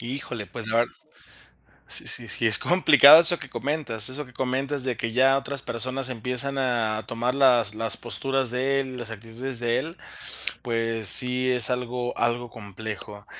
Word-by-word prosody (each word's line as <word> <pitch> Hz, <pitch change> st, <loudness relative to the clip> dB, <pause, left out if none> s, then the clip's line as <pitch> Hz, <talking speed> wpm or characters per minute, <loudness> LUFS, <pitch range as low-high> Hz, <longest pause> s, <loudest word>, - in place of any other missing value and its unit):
Híjole, 120 Hz, -3 st, -5 dB
pues 115 Hz, 0 st, -9 dB
lar 115 Hz, +2 st, +2 dB, 1.0 s
Sí -, -, 0 dB
sí 120 Hz, -, +1 dB
sí 115 Hz, -, -3 dB
es 110 Hz, -1 st, +4 dB
complicado 155 Hz, -3 st, +7 dB
eso 170 Hz, 0 st, +1 dB
que -, -, -10 dB
comentas 135 Hz, -7 st, -2 dB
eso 145 Hz, +3 st, -6 dB
que 125 Hz, -, -18 dB
comentas 135 Hz, +2 st, -2 dB
de 125 Hz, -3 st, -2 dB
que, 115 Hz, -1 st, -4 dB
ya 135 Hz, +2 st, +4 dB
otras 140 Hz, -1 st, -4 dB
personas 130 Hz, +3 st, -2 dB
empiezan 125 Hz, +3 st, -1 dB
a 115 Hz, -4 st, -1 dB
tomar 120 Hz, +2 st, -2 dB
las 125 Hz, -6 st, +3 dB
las 115 Hz, 0 st, -2 dB
posturas 135 Hz, +2 st, -2 dB
de 135 Hz, +2 st, 0 dB
él, 130 Hz, -1 st, -7 dB
las 120 Hz, -2 st, -7 dB
actitudes 115 Hz, +3 st, -6 dB
de 120 Hz, 0 st, +1 dB
él, 165 Hz, +6 st, -7 dB, 0.6 s
pues 115 Hz, -3 st, -1 dB
sí 125 Hz, +2 st, +3 dB
es 125 Hz, -3 st, +3 dB
algo 125 Hz, 0 st, -3 dB
algo 120 Hz, +1 st, -1 dB
complejo. 105 Hz, -1 st, -9 dB
125 Hz, 165 wpm, -25 LUFS, 115-135 Hz, 1.0 s, complicado